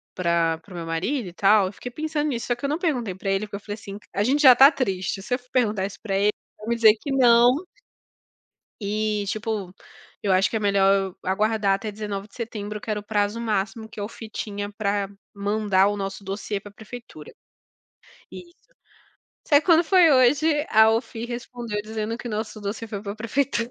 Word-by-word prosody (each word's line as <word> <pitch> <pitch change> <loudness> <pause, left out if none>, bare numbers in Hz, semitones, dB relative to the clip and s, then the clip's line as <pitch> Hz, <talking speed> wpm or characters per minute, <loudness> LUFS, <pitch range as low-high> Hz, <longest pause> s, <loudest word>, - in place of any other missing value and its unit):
pra 170 -2 +1
para 185 +3 -16
o - - -9
meu 170 - -5
marido 185 - -2
e - - -14
tal?", 200 +1 +4
eu 190 - -7
fiquei 245 +5 -8
pensando 305 +2 -2
nisso, 240 -5 -3
só 245 - +1
que 240 - -19
eu - - 0
não 300 - 0
perguntei 250 - -1
pra 195 +1 -4
ele, 195 +2 0
porque 205 - -7
eu - - -10
falei 205 0 -7
assim: 205 -2 -10
"C 210 - -20
a 200 - +1
gente 275 +6 +2
já 260 -4 +9
tá 270 +4 +8
triste 195 -8 -2
se 210 - -4
eu - - +2
f 250 0 -27
perguntar 210 -6 +1
isso 200 0 -8
pra 200 -3 -2
ele, 205 +1 +3 0.3
vai 215 - -11
me 235 - +1
dizer 225 -2 +6
que 285 - -4
não" 240 -2 +6 1.3
eh, 210 0 -1
tipo, 210 -2 -3 0.5
eu 200 - 0
acho 185 +1 +3
que - - -5
é - - +1
melhor 200 -1 +3
eu 195 -2 -1
aguardar 210 +1 +1
até 210 +2 -5
19 205 -1 -5
de - - -22
setembro, 210 -3 -5
que 215 - -10
era 210 - -1
o - - -11
prazo 205 +1 0
máximo 220 0 -2
que 220 - -10
a - - -2
OFII 220 +1 -8
tinha 205 -1 -5
pra, 200 -1 -1 0.3
mandar 200 -1 +2
o 205 0 -1
nosso 195 0 -5
dossiê 200 +1 -4
para 205 +1 -13
a - - -30
prefeitura. 220 -9 -11 1.0
Isso. 345 -1 -11 0.9
Só 290 - +5
que - - -4
quando 335 -2 +6
foi 350 -1 +5
hoje, 295 +4 +3
a 220 0 +6
OFII 225 0 -2
respondeu 240 -3 -5
dizendo 220 +1 -4
que 240 - -6
o - - -5
nosso 215 0 -4
dossiê 210 +3 -4
foi 210 -2 -5
para 200 -1 -4
a - - -12
prefeitura. 235 +1 -1
215 Hz, 225 wpm, -24 LUFS, 200-240 Hz, 1.3 s, já